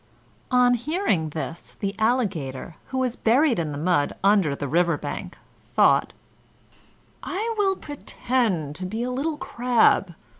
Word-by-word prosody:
On 250 -1 +4
hearing 245 - 0
this 160 +2 -6
the 200 -1 -3
Alligator, 185 - -1
who 260 - -4
was 255 -2 0
buried 250 - +3
in 155 -3 -2
the 145 - -5
mud 155 -2 +1
under 195 -8 +3
the 145 - -4
river 170 +2 +2
bank, - - -6 0.4
thought: - - +4 1.1
"I 440 +5 -2
will 395 -2 +2
pretend 235 - -2
to 185 - -4
be 220 +5 -3
a 250 - -2
little 295 +5 -2
crab." 235 - +2
220 Hz, 140 wpm, -24 LUFS, 165-255 Hz, 1.1 s, On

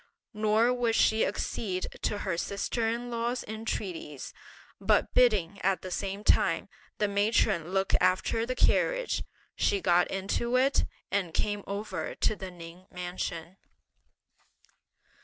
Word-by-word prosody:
Nor 215 +3 +3
would 240 -2 +1
she 220 0 +4
accede 185 -4 -2 0.2
to 205 - 0
her 190 -3 -2
sister 200 +5 -1
in 240 +1 -3
law's 235 +1 -1
entreaties, 195 -9 -5 0.5
but - - +2
bidding, 205 -6 +3
at 190 0 +1
the 185 - -6
same 200 +2 -3
time, - - +3 0.3
the 210 - +2
matron 200 -4 +2
look 190 +1 0
after 185 +5 +2
the 255 +2 -2
carriage, - - +2 0.3
she 200 - +2
got 180 -1 +3
into 200 +5 -1
it, 265 +2 +3 0.3
and 185 -5 -1
came 205 -1 0
over 205 +2 -4
to 215 - +1
the 190 -1 -7
Ning 175 +1 -12
Mansion. 180 -1 -5
200 Hz, 130 wpm, -29 LUFS, 185-225 Hz, 0.5 s, she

